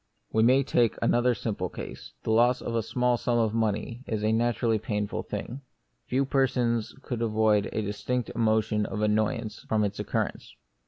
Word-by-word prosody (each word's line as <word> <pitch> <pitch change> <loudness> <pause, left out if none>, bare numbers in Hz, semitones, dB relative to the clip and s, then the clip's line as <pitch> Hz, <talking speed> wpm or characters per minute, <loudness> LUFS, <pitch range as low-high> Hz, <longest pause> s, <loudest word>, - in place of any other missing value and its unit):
We 110 - +2
may 130 +4 +5
take 120 -3 +2
another 120 +1 +2
simple 100 -6 -3
case: - - -8
The - - -1
loss 120 +3 +4
of 120 - -4
a 115 - +1
small 125 +2 +1
sum 120 0 0
of 110 -2 +1
money 115 +2 -1
is 110 -2 -2
a 110 - +2
naturally 115 0 +1
painful 105 -1 -2
thing; 130 +4 -6 0.5
few 135 +2 +1
persons 125 -4 +1
could 120 -3 -4
avoid 110 -2 +2
a 110 - -1
distinct 110 +4 -2
emotion 110 -2 +1
of 105 - -3
annoyance 110 +1 0
from 110 -1 +2
its 100 0 -2
occurrence. - - -3
115 Hz, 170 wpm, -27 LUFS, 105-120 Hz, 0.5 s, may